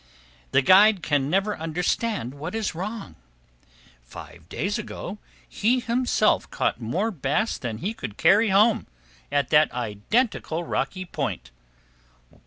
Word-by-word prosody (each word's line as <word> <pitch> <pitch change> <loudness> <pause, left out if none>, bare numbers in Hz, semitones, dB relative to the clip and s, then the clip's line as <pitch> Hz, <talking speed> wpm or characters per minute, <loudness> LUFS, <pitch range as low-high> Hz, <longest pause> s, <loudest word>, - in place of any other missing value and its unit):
The 135 +1 +3
guide 195 +4 +6
can 145 -2 +1
never 195 +4 +1
understand 170 - -2
what 155 +7 -6
is 220 -4 -2
wrong. 200 +5 -6 0.8
Five - - -12
days - - -2
ago, - - -7 0.3
he 235 - +1
himself 240 -2 +1
caught - - -1
more 180 - -1
bass 165 +6 -1
than 115 -3 -4
he 200 - -3
could 110 - -7
carry 205 +7 +4
home, 210 +3 +3 0.4
at 145 -1 +1
that 150 0 +5
identical 140 - -1
rocky 185 +2 -3
point. 65 - -4
180 Hz, 125 wpm, -25 LUFS, 140-215 Hz, 0.8 s, guide